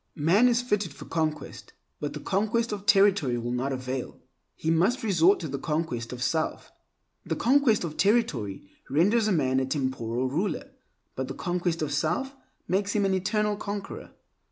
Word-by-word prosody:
Man 175 +11 +4
is 245 0 +2
fitted 210 - -1
for - - -10
conquest, 155 -2 -3 0.3
but 145 -1 -4
the 150 - -6
conquest 215 +7 0
of 205 0 -5
territory 195 - +4
will 120 +1 -3
not 125 +3 -1
avail; 130 0 -4 0.4
he 160 - -1
must 190 +11 +2
resort 190 -2 +4
to 160 - -3
the 140 -1 -4
conquest 150 -7 -2
of 125 0 -4
self. 160 +3 -1 0.5
The - - -2
conquest 250 -4 +3
of 160 -3 -5
territory 150 - +1 0.3
renders 210 - +3
man 130 -8 +2
a 130 - 0
temporal 130 -3 -1
ruler, 165 +6 -2 0.4
but 130 0 -3
the 135 - -6
conquest 175 -2 -1
of 145 -1 -2
self 175 - -1 0.3
makes 200 +2 0
him 205 -2 +2
an 195 - +2
eternal 210 +3 0
conqueror. 205 -1 -6
165 Hz, 165 wpm, -27 LUFS, 135-205 Hz, 0.5 s, Man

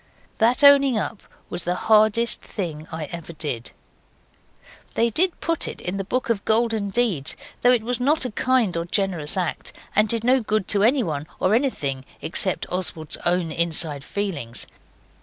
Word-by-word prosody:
That 240 +5 +3
owning 280 -3 +7
up 215 0 -3 0.3
was 175 - -2
the 175 +1 -1
hardest 220 +3 +3
thing 160 -6 -6
I 160 -1 -4
ever 170 -1 -7
did. 130 -8 -4 1.3
They 230 0 +2
did 355 - 0
put 330 -1 -1
that - - -2
in 185 +2 -3
the 195 - -2
Book 250 +5 -1
of 200 -3 -2
Golden 220 -2 +1
Deeds, 195 - 0 0.2
though 245 - +5
it 240 -3 +2
was 245 +1 -1
not 280 +3 +1
a 250 - -3
kind 240 -5 +1
or 170 0 -2
generous 175 -4 -1
act, 180 -3 -2 0.2
and 215 +1 +3
did 230 0 -1
no 255 +2 +4
good 215 -3 -1
to 200 - +3
anyone 200 - +1
or 185 - +2
anything 145 - -1 0.2
except 185 +2 0
Oswald's 165 -4 +1
own 175 -2 +1
inside 160 -3 +1
feelings. 145 - -3
200 Hz, 165 wpm, -23 LUFS, 165-235 Hz, 1.3 s, owning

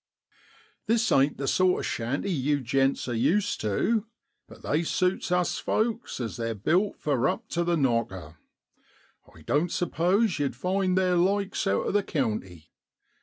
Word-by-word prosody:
' - - -31
This 225 0 +2
ain't 140 +2 +3
the 135 - -3
sort 185 +3 +2
of - - -4
shanty 130 +12 -2
yew 145 -2 0
gents 135 +2 0
are 120 - -2
used 170 - +1
tu, 210 - 0 0.4
but - - -15
they 150 +3 +1
suits 180 +2 -1
us 180 -1 +1
folks 230 - -1
as 115 -3 -4
they're 115 -1 -2
built 180 - +1
for 135 -3 0
up 225 - -4
to 170 - 0
the 170 0 +1
knocker. 110 - -1 0.9
I 80 - -17
doan't 150 - 0
suppose 180 +3 +1
yow'd 140 -4 -1
find 185 +5 0
theer 180 -1 +2
likes 195 +2 0
out 100 - +1
o' - - 0
the 205 - +2
county. 105 - -3
160 Hz, 165 wpm, -27 LUFS, 120-190 Hz, 0.9 s, ain't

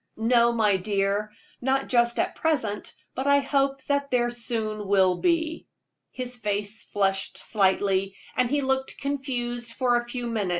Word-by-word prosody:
"No, 235 +1 +4
my 215 -4 +3
dear 200 +2 0 0.3
not 270 +2 +1
just 235 -1 +2
at 355 +1 0
present; 245 -11 -1 0.2
but 265 +2 -3
I 280 0 +5
hope 275 -1 0
that 280 0 0
there 240 -2 +1
soon 220 -3 -3
will 190 -2 +4
be." 330 - 0 0.4
His 250 -1 -4
face 205 -1 -3
flushed 195 -1 0
slightly, 195 -1 +1 0.2
and 250 -1 +2
he 290 +2 +1
looked 265 0 -1
confused 245 -4 -3
for 245 0 +2
a 240 - -2
few 245 0 -4
moments. 220 -5 -1
240 Hz, 155 wpm, -26 LUFS, 205-265 Hz, 0.4 s, I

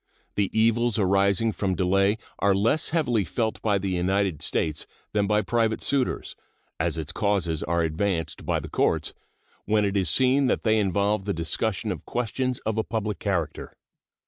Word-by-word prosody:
The 100 -2 0
evils 115 +1 +2
arising 100 +2 +2
from 95 -3 -1
delay 95 +4 +2 0.2
are 100 0 +3
less 115 +10 +1
heavily 125 -10 +1
felt 110 +5 -2
by 105 -2 +2
the 95 0 -2
United 90 -2 0
States 75 -2 -1 0.3
than 105 -1 +1
by 105 0 +2
private 115 +1 +1
suitors, 135 -3 -1 0.4
as 80 0 0
its 80 -3 -3
causes 95 -7 0
are 85 0 0
advanced 80 +1 -1
by - - 0
the - - -7
courts - - 0 0.5
when 105 -1 +2
it 100 0 -1
is 95 -5 +1
seen 130 - +3
that - - 0
they 110 -1 +3
involve 100 0 +1
the 100 - -1
discussion 100 +6 -1
of 85 -6 -5
questions 125 +1 -2
of 110 0 0
a - - +1
public 110 -2 -3
character. 90 -6 -3
100 Hz, 170 wpm, -25 LUFS, 95-110 Hz, 0.5 s, are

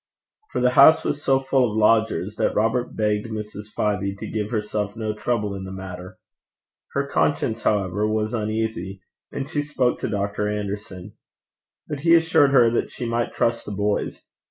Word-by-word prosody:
For - - -1
the 125 0 +4
house 140 +5 +7
was 145 - -1
so 135 0 +3
full 135 -2 +2
of 105 - -4
lodgers, 110 -2 +2
that - - 0
Robert 115 +3 0
begged 105 0 0
Mrs. 105 -1 -6
Fyvie 100 -2 -1
to - - -6
give 105 -1 -2
herself 105 -2 -2
no 110 -1 -2
trouble 105 -2 -1
in 95 -1 -6
the 95 - -7
matter. 95 0 -8 0.8
Her 140 0 0
conscience, 120 -5 0
however, 105 0 +1
was 110 +1 -1
uneasy, 110 -4 -3 0.3
and 135 - -4
she 150 -1 -1
spoke 140 -4 0
to - - -3
Dr. 100 0 -1
Anderson; 100 -2 -5 0.7
but 145 -2 -4
he 165 +3 +5
assured 165 -4 +4
her 125 -4 +5
that 120 - 0
she 125 - -6
might 115 0 -1
trust 115 0 0
the 105 - -6
boys. 100 +1 -2
110 Hz, 175 wpm, -23 LUFS, 105-125 Hz, 0.8 s, house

